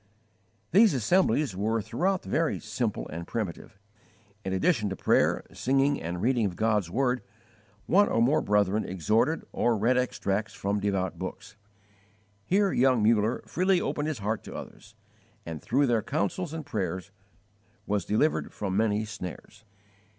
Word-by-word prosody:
These 205 -4 +6
assemblies 145 - +2
were 110 +4 0
throughout 175 - -1
very 165 -1 0
simple 115 -5 -3
and 85 +2 -6
primitive. 100 -3 -5 0.7
In 95 - -3
addition 105 - +1
to 95 - -3
prayer, - - +2
singing, 135 +2 +1
and 85 +2 -4
reading 120 -3 +2
of 90 - -6
God's 105 -4 +1
word, 125 +4 0 0.6
one 205 +3 +4
or - - +1
more 125 +6 +3
brethren 105 0 +2
exhorted 105 - 0
or 120 -2 +1
read 120 +5 +2
extracts 110 -4 -1
from 100 +1 -1
devout 95 -3 -1
books. - - -7 0.9
Here 195 - +2
young 125 -3 +3
Muller 110 +1 +2
freely 185 +1 +2
opened 150 -2 -2
his 155 - -2
heart 105 +1 -2
to - - -8
others, - - -10 0.5
and 80 -2 -6
through 140 +4 +2
their 120 -4 +2
counsels 150 - -2
and 160 -2 -6
prayers 95 - -3 0.7
was 105 -2 0
delivered 110 - +1
from 95 -2 -3
many 105 0 +1
snares. 105 0 -9
110 Hz, 145 wpm, -28 LUFS, 100-135 Hz, 0.9 s, These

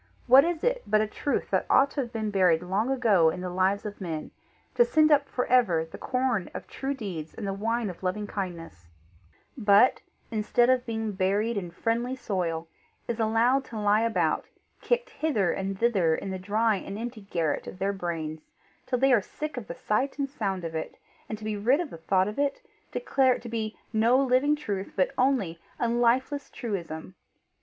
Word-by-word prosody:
What 265 +2 +8
is 335 -1 -2
it - - +1
but 215 - +3
a - - +2
truth 275 +6 -2
that - - +1
ought 275 +2 +5
to 285 - -1
have 240 -3 -5
been 220 -2 -2
buried 180 -4 +3
long 195 +7 0
ago 220 -11 +4
in 180 - -4
the 180 -1 -4
lives 190 +3 +1
of 210 -1 -6
men 160 -4 -4 0.4
to 480 - +5
send 310 -8 +3
up 285 -1 +4
for 250 - -1
ever 190 -11 +3
the 160 - -11
corn 250 -7 -1
of - - -6
true 275 +1 -4
deeds 180 - -6
and 220 - -5
the 195 - -1
wine 225 +3 -1
of 180 -3 -7
loving 190 +3 -2
kindness, 170 - -6 0.7
but 210 +1 +4 0.3
instead 235 +3 +3
of 255 -1 +1
being 220 -1 -2
buried 200 +4 0
in 185 -4 -3
friendly 230 +8 -1
soil, 170 -9 -2 0.4
is 235 -1 -3
allowed 230 +5 +3
to 225 -3 -7
lie 210 +1 +3
about, 230 -1 +1 0.4
kicked - - 0
hither 225 - 0
and 195 0 -3
thither 195 -9 +3
in 195 - -5
the 190 - -4
dry 215 +3 +1
and 195 +1 -6
empty 230 0 -6
garret 170 -6 -2
of - - -8
their 195 +2 0
brains, 160 -4 -5 0.4
till 255 - +1
they 270 +1 +4
are 230 - +5
sick 305 +9 -6
of 245 -5 -6
the 170 - -6
sight 260 +7 -1
and 275 -2 -2
sound 195 -9 -2
of 165 -1 -4
it, 160 0 -5 0.3
and 215 - -3
to 215 - -13
be 215 0 -2
rid 240 +8 +2
of 345 -5 -3
the - - -8
thought 185 +3 +1
of 210 +5 -5
it, 285 -1 0 0.3
declare 265 - +2
it - - -8
to 235 - -7
be 220 -1 -3 0.2
no 230 +3 +4
living 270 +2 +3
truth 205 -10 -4
but 185 - +2
only 250 -11 +1 0.2
a 235 - +1
lifeless 245 +4 +1
truism! 185 -7 -5
215 Hz, 200 wpm, -27 LUFS, 190-255 Hz, 0.7 s, What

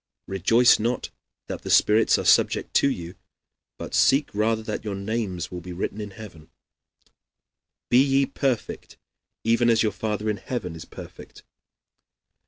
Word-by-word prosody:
"Rejoice 115 +6 +4
not 120 +3 -2 0.3
that - - -6
the - - -7
spirits 110 +2 +4
are - - -4
subject - - +3
to 140 - +4
you, 85 -8 -5 0.6
but - - -8
seek 140 +2 +3
rather 110 +1 0
that - - -5
your 105 -2 -4
names 100 -3 -3
be 90 0 -8
written 95 +4 -4
in 105 - -6
heaven." 95 -6 -12 1.4
"Be 125 +2 +6
ye 135 0 +2
perfect 130 -3 -3 0.5
even 115 +1 +2
as 115 -1 +3
your 110 - +1
Father 105 +2 -3
in 105 -1 0
heaven 95 -4 -5
is 80 - -9
perfect." - - -12
110 Hz, 145 wpm, -24 LUFS, 95-120 Hz, 1.4 s, Be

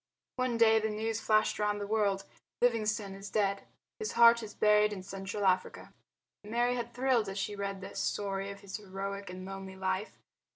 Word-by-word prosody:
One 255 -2 0
day 225 -1 +6
the 220 0 -1
news 220 +1 -2
flashed 215 -1 +2
round 210 0 +1
the 205 - -3
world: 200 -2 +1 0.4
"Livingstone 215 -4 +1
is 195 +1 -8
dead. 200 -2 0 0.3
His 435 - -3
heart 235 0 +7
is 215 -2 -8
buried 210 0 +4
in 190 -3 -6
Central 195 +1 -4
Africa." 185 -1 0 0.5
Mary 240 +3 +1
had 240 -1 -4
thrilled 245 -5 +2
as 195 - -5
she 205 +1 -2
read 200 -1 -4
the 195 - -8
story 195 -1 -2
of 200 0 -9
his 200 0 -6
heroic 200 0 -5
and 185 +1 -7
lonely 195 0 -7
life. 190 +2 -2
205 Hz, 180 wpm, -31 LUFS, 195-220 Hz, 0.5 s, heart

